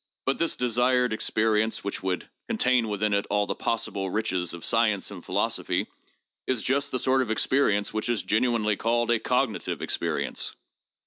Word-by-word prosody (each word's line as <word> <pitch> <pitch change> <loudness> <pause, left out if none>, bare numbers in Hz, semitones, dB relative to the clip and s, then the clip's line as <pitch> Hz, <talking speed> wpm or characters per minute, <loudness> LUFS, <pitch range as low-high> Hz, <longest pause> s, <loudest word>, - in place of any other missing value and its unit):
But 135 - 0
this 165 - +2
desired 125 0 +2
experience, 110 0 +1
which 100 - -4
would 95 -2 -2 0.2
contain 125 -2 +2
within 105 0 0
it 100 0 0
all 105 0 +2
the - - -2
possible 100 -4 -2
riches 95 -4 -1
of 85 -1 -6
science 110 -4 +2
and 95 -4 -9
philosophy, - - -1 0.6
is 130 -4 0
just 140 +2 +1
the 130 - -1
sort 130 +1 +2
of 125 - -2
experience 110 -3 +2
which 110 +2 -2
is 120 -3 0
generally 110 -2 +1
called 120 +1 +1
a 120 - +3
cognitive 125 -2 -1
experience. - - -2
110 Hz, 165 wpm, -26 LUFS, 105-125 Hz, 0.6 s, a